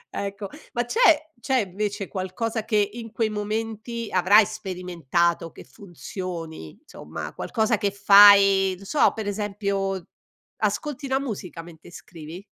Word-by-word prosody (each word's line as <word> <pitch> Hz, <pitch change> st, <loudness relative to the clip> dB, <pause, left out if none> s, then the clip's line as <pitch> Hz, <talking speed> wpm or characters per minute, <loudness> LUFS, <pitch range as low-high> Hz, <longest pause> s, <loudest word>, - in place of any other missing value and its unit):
Ecco. 200 Hz, 0 st, -4 dB, 0.3 s
Ma 240 Hz, -1 st, -1 dB
c'è 320 Hz, -, +3 dB
c'è, 265 Hz, +2 st, 0 dB
invece, 200 Hz, +1 st, -4 dB
qualcosa 215 Hz, +4 st, -3 dB
che 210 Hz, -3 st, +2 dB
in 230 Hz, -2 st, -8 dB
quei 225 Hz, -1 st, -1 dB
momenti 220 Hz, +2 st, -4 dB
avrai 200 Hz, +4 st, +5 dB
sperimentato 175 Hz, -5 st, -2 dB
che -, -, -13 dB
funzioni, 165 Hz, -, -8 dB
insomma, -, -, -8 dB
qualcosa 220 Hz, 0 st, 0 dB
che 205 Hz, -, +1 dB
fai, 200 Hz, -1 st, +6 dB
non 195 Hz, -, -14 dB
so, 295 Hz, -, +3 dB
per 220 Hz, -2 st, -5 dB
esempio, 200 Hz, -2 st, -3 dB, 0.5 s
ascolti 290 Hz, -2 st, -2 dB
la 265 Hz, +1 st, +1 dB
musica 190 Hz, -10 st, -6 dB
mente 165 Hz, -1 st, -14 dB
scrivi? 170 Hz, +1 st, -11 dB
200 Hz, 130 wpm, -24 LUFS, 185-225 Hz, 0.5 s, fai